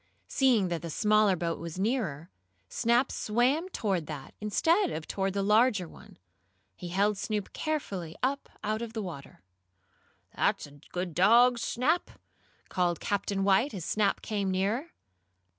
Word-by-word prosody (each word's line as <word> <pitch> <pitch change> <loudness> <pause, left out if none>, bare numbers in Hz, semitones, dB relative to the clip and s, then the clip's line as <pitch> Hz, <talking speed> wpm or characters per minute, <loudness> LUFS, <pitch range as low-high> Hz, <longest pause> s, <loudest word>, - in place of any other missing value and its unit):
Seeing 240 -9 +3
that 170 -2 -2
the 170 - -6
smaller 210 +2 +3
boat 165 -1 -2
was 170 0 -7
nearer, 190 - -2 0.4
Snap 240 +2 +2
swam 255 - +1
toward 190 - -1
that, 145 -4 -7
instead 330 - +2
of 155 - -5
toward 195 -1 -1
the 200 0 -1
larger 210 -2 +3
one. - - -15 0.6
He 180 - -8
held 200 +3 +1
Snoop 210 -2 -3
carefully 195 - -3
up 275 +2 -1
out 215 +1 -1
of 230 -1 -5
the 220 - -3
water. 140 - -9 0.9
"That's - - +1
a 145 0 -15
good 180 -1 -3
dog, 235 +8 +5
Snap!" 290 +10 0 0.6
called 175 -2 0
Captain 200 -1 -1
White, 200 +6 +3
as 175 -4 -5
Snap 205 -2 +1
came 200 -3 -1
nearer. 205 - -1
205 Hz, 145 wpm, -29 LUFS, 180-235 Hz, 0.9 s, dog